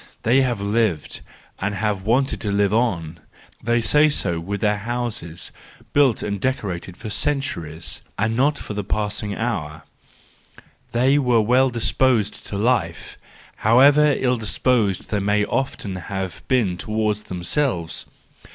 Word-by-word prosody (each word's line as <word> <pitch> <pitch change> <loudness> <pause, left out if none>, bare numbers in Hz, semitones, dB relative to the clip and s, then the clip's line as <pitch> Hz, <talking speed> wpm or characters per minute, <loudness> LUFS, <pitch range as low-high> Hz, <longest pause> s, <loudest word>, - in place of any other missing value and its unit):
They 125 +4 +4
have 125 -5 0
lived 100 -5 -1 0.4
and 100 +1 -2
have 105 -1 -1
wanted 125 +7 +1
to 105 - -2
live 100 0 +2
on—they 110 +2 -2
say 150 +6 +4
so 85 - 0
with 100 +5 -4
their 105 -1 +1
houses, 110 -7 -4 0.4
built 140 -5 +3
and 100 -1 -3
decorated 95 -8 -3
for 110 - -7
centuries, 85 - -2 0.2
and 110 +2 0
not 140 +4 +2
for 105 - -6
the 105 0 -3
passing 105 0 -2
hour: 80 -10 -3 1.1
they 130 +4 +3
were 125 -4 +3
well 125 +4 +3
disposed 120 -1 0
to 100 - -4
life, 120 +2 0 0.4
however 140 +6 +5
ill 125 -1 +1
disposed 110 -2 0
they 105 - +1
may 105 +1 +1
often 110 -7 -2
have 95 +1 -5
been 110 -9 +1
towards 105 +1 -1
themselves. 90 - -2
110 Hz, 135 wpm, -22 LUFS, 100-125 Hz, 1.1 s, however